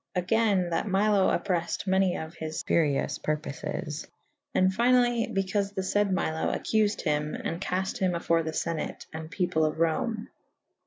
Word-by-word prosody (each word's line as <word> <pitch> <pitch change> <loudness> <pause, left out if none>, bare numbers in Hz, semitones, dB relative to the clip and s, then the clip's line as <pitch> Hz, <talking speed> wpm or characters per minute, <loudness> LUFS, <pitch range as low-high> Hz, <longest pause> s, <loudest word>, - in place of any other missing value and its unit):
Agayne 185 -1 +2
that 170 - 0
Milo 200 0 +3
opprel 180 -4 +1
fyd 170 - -4
many 190 -1 +2
of 160 +1 -6
his 160 -1 -5
furioufe 150 -4 +1
purpofes. 150 +1 -3 0.5
And 185 0 +4
fynally 240 +2 +3
bycaufe 195 +1 -1
the 190 - -1
layd 205 -1 +2
Milo 160 -4 0
accufed 215 -1 +1
hym 150 -1 0
and 165 +2 -4
cafte 190 +4 -2
hym 185 -3 +1
afore 170 0 +2
the 160 0 -3
Senate 165 0 -3
and 160 0 -6
people 175 -4 0
of 155 0 0
Rome. 210 +7 0
185 Hz, 155 wpm, -28 LUFS, 160-205 Hz, 0.5 s, And